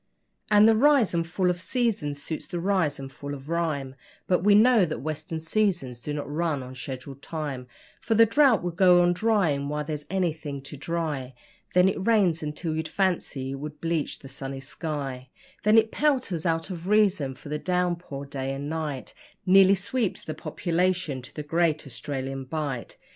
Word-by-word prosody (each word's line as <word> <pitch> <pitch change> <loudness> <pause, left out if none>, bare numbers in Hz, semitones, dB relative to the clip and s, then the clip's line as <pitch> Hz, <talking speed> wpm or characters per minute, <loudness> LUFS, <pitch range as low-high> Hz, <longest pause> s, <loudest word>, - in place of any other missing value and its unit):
And 210 0 +7
the 225 - +6
'rise 270 -3 +4
and 170 -1 0
fall 180 +1 +1
of 175 0 -5
seasons' 185 - -1
suits 160 - -5
the 175 - -4
rise 175 -6 +1
and 135 0 -7
fall 140 +1 -6
of 135 +2 -11
rhyme, 155 -6 -1 0.3
But 180 - +2
we 205 0 +6
know 225 0 +6
that 155 -3 -1
western 155 +4 -4
seasons 160 - 0
do 150 - -5
not 145 -1 -3
run 150 -2 -1
on 130 0 -9
schedule 130 +1 -6
time; 140 -2 -5 0.3
For 225 - 0
the 230 +1 +7
drought 250 -2 +4
will 175 - -1
go 180 0 +5
on 175 0 +3
drying 175 -9 +1
while 150 0 -2
there's 150 -1 -5
anything 160 -7 -2
to 140 - -8
dry, 145 -4 -3 0.4
Then 180 +1 +6
it 190 0 -1
rains 195 -7 +3
until 155 +1 -3
you'd 160 0 -2
fancy 160 -7 -1
it 135 - -5
would 150 +1 -7
bleach 165 -3 -1
the 135 - -12
sunny 135 0 -6
sky 135 -3 -5 0.3
Then 215 +2 +5
it 225 0 +4
pelters 255 - 0
out 165 +3 -1
of 175 +1 -6
reason, 195 -11 +3
for 145 - -12
the 150 0 -2
downpour 175 -6 -2
day 135 -1 -4
and 140 +1 -5
night 150 -4 -4 0.3
Nearly 195 +1 +7
sweeps 205 +2 -2
the 155 - -5
population 175 -3 -1
to 125 - -12
the 150 - -4
Great 160 0 +1
Australian 135 +2 -5
Bight. 135 - -4
160 Hz, 185 wpm, -26 LUFS, 140-185 Hz, 0.4 s, And